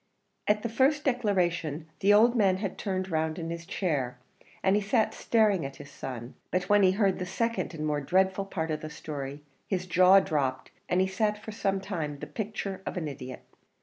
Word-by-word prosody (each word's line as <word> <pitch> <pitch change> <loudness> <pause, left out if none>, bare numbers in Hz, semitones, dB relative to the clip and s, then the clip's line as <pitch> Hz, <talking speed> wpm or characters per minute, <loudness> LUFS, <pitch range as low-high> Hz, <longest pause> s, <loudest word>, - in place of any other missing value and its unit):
At 210 0 +2
the - - 0
first 275 +6 +2
declaration 175 - 0
the 200 +1 +4
old 230 +4 +6
man 195 -5 +3
had 195 -1 -3
turned 185 -2 -2
round 160 0 0
in 165 -1 -4
his 170 0 -6
chair, 145 -11 -1 0.5
and 190 +1 +4
he 210 - +2
sat 220 +2 +1
staring 215 -7 +2
at 135 0 -5
his 145 +1 -11
son; 125 -3 -7 0.2
but 180 0 -1
when 205 0 +5
he 185 -1 +5
heard 195 -2 +2
the 180 - -2
second 230 -1 -1
and 155 -1 -3
more 150 -1 0
dreadful 190 +5 +2
part 160 -4 -3
of 155 - -2
the 155 - -6
story, 145 -1 -6 0.2
his 185 -2 -1
jaw 185 +2 +6
dropped, 135 -7 -1 0.2
and 180 +1 +3
he 190 - +2
sat 210 +2 0
for 220 +1 -8
some 200 -2 0
time 165 -7 -4
the - - -6
picture 205 -3 -4
of - - -5
an 165 -3 -2
idiot. 130 -3 -7
185 Hz, 205 wpm, -29 LUFS, 155-205 Hz, 0.5 s, old